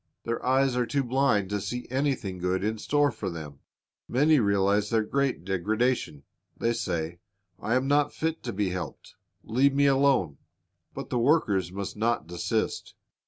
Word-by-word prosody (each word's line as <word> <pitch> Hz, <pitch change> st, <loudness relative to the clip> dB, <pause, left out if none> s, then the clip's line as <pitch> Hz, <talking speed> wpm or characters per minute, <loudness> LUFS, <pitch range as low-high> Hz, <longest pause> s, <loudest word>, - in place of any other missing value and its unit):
Their 115 Hz, 0 st, -3 dB
eyes 130 Hz, 0 st, +2 dB
are 125 Hz, -1 st, 0 dB
too 140 Hz, +1 st, 0 dB
blind 125 Hz, -6 st, +1 dB
to 105 Hz, -1 st, -1 dB
see 120 Hz, +5 st, -4 dB
anything 130 Hz, -9 st, -1 dB
good 90 Hz, +1 st, -1 dB
in 110 Hz, +1 st, -1 dB
store 145 Hz, +2 st, +2 dB
for 105 Hz, -4 st, -4 dB
them. 75 Hz, -5 st, -8 dB, 0.5 s
Many 150 Hz, +4 st, +4 dB
realize 100 Hz, -1 st, +2 dB
their 110 Hz, -1 st, +2 dB
great 135 Hz, -5 st, -1 dB
degradation. 105 Hz, -, -1 dB, 0.3 s
They 115 Hz, 0 st, +1 dB
say, 85 Hz, -6 st, -3 dB, 0.4 s
I 115 Hz, -, 0 dB
am 130 Hz, +1 st, +1 dB
not 145 Hz, +1 st, +3 dB
fit 160 Hz, 0 st, -2 dB
to 120 Hz, -, -2 dB
be 100 Hz, -3 st, -1 dB
helped, 90 Hz, -5 st, -6 dB, 0.3 s
leave 135 Hz, +5 st, +2 dB
me 140 Hz, 0 st, +4 dB
alone. 135 Hz, -, +3 dB, 0.6 s
But -, -, -7 dB
the 125 Hz, -, +1 dB
workers 110 Hz, -, +2 dB
must 100 Hz, +1 st, -5 dB
not 115 Hz, +2 st, 0 dB
desist. 85 Hz, +1 st, -2 dB
115 Hz, 165 wpm, -27 LUFS, 95-135 Hz, 0.6 s, Many